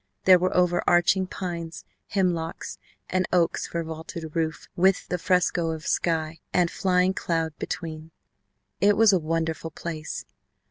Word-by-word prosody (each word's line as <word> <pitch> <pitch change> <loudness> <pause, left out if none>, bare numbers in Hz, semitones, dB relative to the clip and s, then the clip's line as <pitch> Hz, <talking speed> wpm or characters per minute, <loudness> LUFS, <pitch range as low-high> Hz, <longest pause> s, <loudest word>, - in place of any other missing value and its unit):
There 185 -1 +7
were 185 +1 0
over 175 -1 +3
arching 185 +2 +4
pines, 170 -3 -5 0.2
hemlocks, 175 -4 -2 0.3
and 185 0 0
oaks 175 -2 +1
for 170 -1 -3
vaulted 160 0 -7
roof 160 -2 -2
with 190 +1 +3
the 180 - -1
fresco 175 -2 +2
of 160 0 -5
sky 160 -1 0
and 175 -2 +2
flying 185 0 +2
cloud 165 -4 -1
between. 160 -1 -5 0.7
It 200 +2 +4
was 220 -2 +6
a 185 - +4
wonderful 165 0 -2
place. 155 -1 -6
170 Hz, 140 wpm, -26 LUFS, 160-180 Hz, 0.7 s, There